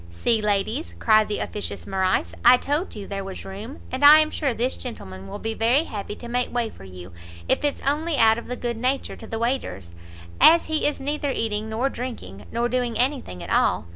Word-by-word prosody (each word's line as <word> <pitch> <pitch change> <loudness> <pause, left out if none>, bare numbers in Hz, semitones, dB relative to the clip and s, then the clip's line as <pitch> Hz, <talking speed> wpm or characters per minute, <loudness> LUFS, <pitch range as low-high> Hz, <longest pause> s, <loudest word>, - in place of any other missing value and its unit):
"See, 220 - 0
ladies," 210 - -1
cried 215 -1 +4
the 210 - -2
officious 210 - -5
Morrice, 185 - 0
"I 250 - +8
told 295 +8 -2
you 205 -2 -7
there 195 -1 -5
was 190 -1 -8
room; 210 +9 -8
and 260 +2 -3
I 295 +2 +10
am 310 0 +2
sure 280 -3 -1
this 245 +3 -1
gentleman 95 - -8
will - - -6
be 225 0 -3
very 235 +7 +2
happy 210 -7 -6
to 240 - -10
make 245 +1 -1
way 235 -2 -1
for - - -14
you, 90 -1 -11 0.4
if - - +1
it's 290 -1 -1
only 300 +3 0
out 225 0 +5
of - - -11
good 235 -2 -2
nature 255 +4 -1
to 225 - -11
the 225 - -4
waiters, 225 - -3 0.5
as 335 +1 +7
he 315 -2 +1
is 295 - -1
neither 290 +1 -2
eating 220 -4 -2
nor 225 +5 0
drinking, 230 - -7
nor 235 +1 0
doing 245 -2 -1
any 265 +2 +1
thing 90 -1 -9
at 85 - -7
all. - - +2
230 Hz, 215 wpm, -24 LUFS, 200-270 Hz, 0.5 s, I